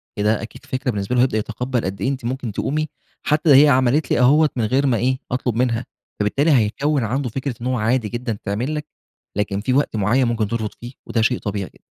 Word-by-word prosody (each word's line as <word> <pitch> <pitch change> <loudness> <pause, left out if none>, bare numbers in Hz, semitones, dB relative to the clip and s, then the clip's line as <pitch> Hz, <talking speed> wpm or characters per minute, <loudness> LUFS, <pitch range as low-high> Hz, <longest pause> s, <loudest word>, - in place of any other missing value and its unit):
كده 105 +1 +1
أكيد 110 - -10
فكرة 130 0 -2
بالنسبة 100 +2 -2
له 125 - +4
هيبدأ 125 -4 +2
يتقبل 125 +2 -2
قد 95 +1 -4
إيه 130 - +1
أنتِ 130 -3 -4
ممكن 125 -1 -3
تقومي 155 +9 -1 0.4
حتّى 155 +1 +1
هي - - +6
عملت 130 +3 +2
لي - - +3
أهو 150 +5 +5
من 115 - 0
غير 135 +5 +2
ما 120 -3 +2
إيه، 130 +3 +1
أطلب 125 -2 -1
منها، 120 -1 0 0.3
فبالتالي 135 +10 +2
هيكون 135 +3 +2
عنده 125 +4 -1
فكرة 130 +1 -4
إنّه 125 0 -1
عادي 115 0 +1
جدًا 120 -3 -3
تعمل 115 +9 -2
لك 150 0 -4 0.5
لكن 100 -1 -1
في 125 +3 0
وقت 140 -4 +1
معيّن 110 +6 +2
ممكن 115 -3 0
ترفض 110 -1 -2
فيه، 120 +2 -9
وده 115 - 0
شيء 125 +2 +2
طبيعي 100 -2 -4
جد - - -25
125 Hz, 215 wpm, -21 LUFS, 110-135 Hz, 0.5 s, هي